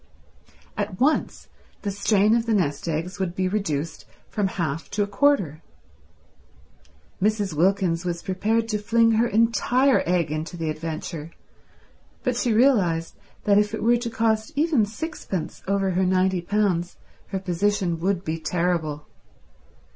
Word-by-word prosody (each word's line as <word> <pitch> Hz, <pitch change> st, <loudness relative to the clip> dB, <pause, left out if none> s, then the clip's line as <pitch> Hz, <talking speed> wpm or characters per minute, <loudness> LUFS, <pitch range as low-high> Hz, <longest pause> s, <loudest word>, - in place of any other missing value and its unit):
At 205 Hz, -3 st, -3 dB
once 295 Hz, +4 st, +1 dB, 0.4 s
the 200 Hz, -, -1 dB
strain 205 Hz, +2 st, +3 dB
of 235 Hz, 0 st, 0 dB
the 225 Hz, -, +2 dB
nest 145 Hz, -6 st, -1 dB
eggs 165 Hz, +4 st, -3 dB
would 180 Hz, -2 st, -2 dB
be 185 Hz, -1 st, 0 dB
reduced 165 Hz, -6 st, -2 dB, 0.2 s
from 205 Hz, -2 st, 0 dB
half 165 Hz, -4 st, -3 dB
to 205 Hz, 0 st, 0 dB
a -, -, -3 dB
quarter. 200 Hz, -, +2 dB, 1.6 s
Mrs. 205 Hz, -3 st, +1 dB
Wilkins 175 Hz, +1 st, +1 dB
was 175 Hz, -1 st, -3 dB
prepared 220 Hz, +4 st, 0 dB
to 210 Hz, -2 st, 0 dB
fling 230 Hz, +2 st, +3 dB
her 225 Hz, +2 st, +3 dB
entire 240 Hz, +4 st, +3 dB
egg 170 Hz, -3 st, +1 dB
into 155 Hz, +3 st, -4 dB
the 160 Hz, -2 st, -2 dB
adventure, 155 Hz, 0 st, -5 dB, 0.9 s
but 255 Hz, -3 st, 0 dB
she 240 Hz, 0 st, 0 dB
realized 205 Hz, -9 st, +3 dB, 0.3 s
that 205 Hz, 0 st, +4 dB
if 210 Hz, +1 st, 0 dB
it 210 Hz, -, -5 dB
were 240 Hz, +1 st, +4 dB
to 235 Hz, 0 st, -3 dB
cost 220 Hz, +1 st, 0 dB
even 295 Hz, -8 st, +2 dB
sixpence 210 Hz, -, -5 dB
over 195 Hz, -1 st, +1 dB
her 185 Hz, +1 st, +1 dB
ninety 185 Hz, 0 st, +2 dB
pounds 180 Hz, -2 st, 0 dB, 0.3 s
her 195 Hz, -, -3 dB
position 185 Hz, -1 st, 0 dB
would 185 Hz, +1 st, 0 dB
be 160 Hz, +1 st, -2 dB
terrible. 160 Hz, -3 st, -1 dB
195 Hz, 145 wpm, -24 LUFS, 170-220 Hz, 1.6 s, that